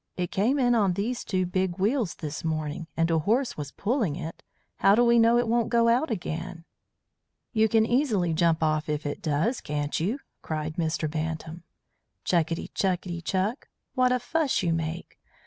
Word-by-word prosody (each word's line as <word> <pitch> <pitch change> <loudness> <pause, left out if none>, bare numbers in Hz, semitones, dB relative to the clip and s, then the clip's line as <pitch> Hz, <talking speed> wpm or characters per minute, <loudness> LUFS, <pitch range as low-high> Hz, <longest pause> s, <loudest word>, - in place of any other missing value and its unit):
"It 180 -1 -2
came 230 +9 +2
in 245 -3 +3
on 205 -6 +3
these 230 +6 -2
two 185 -2 0
big 185 0 -1
wheels 215 0 0
this 155 -1 -6
morning, 155 0 -3
and 165 0 +2
a 165 - +3
horse 230 - +1
was 145 -1 -6
pulling 215 - -1
it. 165 -1 -7 0.4
How 195 +1 +5
do 240 +2 +4
we 235 0 +5
know 230 +1 +5
it 240 -1 +1
won't 235 0 +1
go 230 -1 +3
out 250 +6 +2
again?" 175 -4 -4 0.9
"You 220 -1 +3
can 220 0 +4
easily 225 - +1
jump 165 0 +2
off 155 0 0
if 150 0 -2
it 145 - -4
does, 160 - 0
can't 145 0 -2
you?" 200 - 0 0.2
cried 155 +1 -4
Mr. 160 -1 0
Bantam. 160 +2 -4 0.6
"Chukitty 165 -1 0
chukitty 180 -2 -1
chuk! 195 - -1 0.2
What 255 -1 +3
a 250 - +3
fuss 285 +3 0
you 170 -2 +1
make! 165 +1 -4
180 Hz, 180 wpm, -27 LUFS, 160-230 Hz, 0.9 s, How